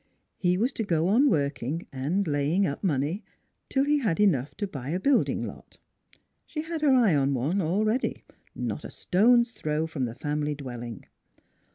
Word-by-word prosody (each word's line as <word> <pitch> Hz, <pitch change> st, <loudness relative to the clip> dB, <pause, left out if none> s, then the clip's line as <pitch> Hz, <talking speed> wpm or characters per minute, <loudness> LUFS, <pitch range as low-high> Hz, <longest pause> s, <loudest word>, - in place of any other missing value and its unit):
He 180 Hz, -1 st, +2 dB
was 240 Hz, +7 st, +1 dB
to 225 Hz, -, -2 dB
go 170 Hz, -3 st, +1 dB
on 260 Hz, +8 st, +5 dB
working 140 Hz, 0 st, -1 dB
and 160 Hz, +9 st, -1 dB
laying 150 Hz, +6 st, +1 dB
up 145 Hz, +1 st, -3 dB
money 155 Hz, +3 st, 0 dB, 0.5 s
till 270 Hz, -, +2 dB
he 295 Hz, 0 st, +3 dB
had 210 Hz, -10 st, 0 dB
enough 150 Hz, -10 st, +2 dB
to 205 Hz, -, -1 dB
buy 140 Hz, -8 st, -6 dB
a 175 Hz, +4 st, -1 dB
building 275 Hz, +6 st, +2 dB
lot. -, -, -11 dB, 0.7 s
She 305 Hz, -, -4 dB
had 325 Hz, -1 st, -4 dB
her 295 Hz, -3 st, +4 dB
eye 230 Hz, -8 st, +4 dB
on 140 Hz, -1 st, +2 dB
one, 155 Hz, +11 st, 0 dB
already, 215 Hz, +9 st, 0 dB, 0.3 s
not -, -, -3 dB
a -, -, -7 dB
stone's 235 Hz, +5 st, +3 dB
throw 155 Hz, -7 st, -2 dB
from 155 Hz, -5 st, -2 dB
the 115 Hz, -1 st, -6 dB
family 150 Hz, +1 st, -2 dB
dwelling. 120 Hz, -6 st, -7 dB
170 Hz, 175 wpm, -27 LUFS, 145-215 Hz, 0.7 s, on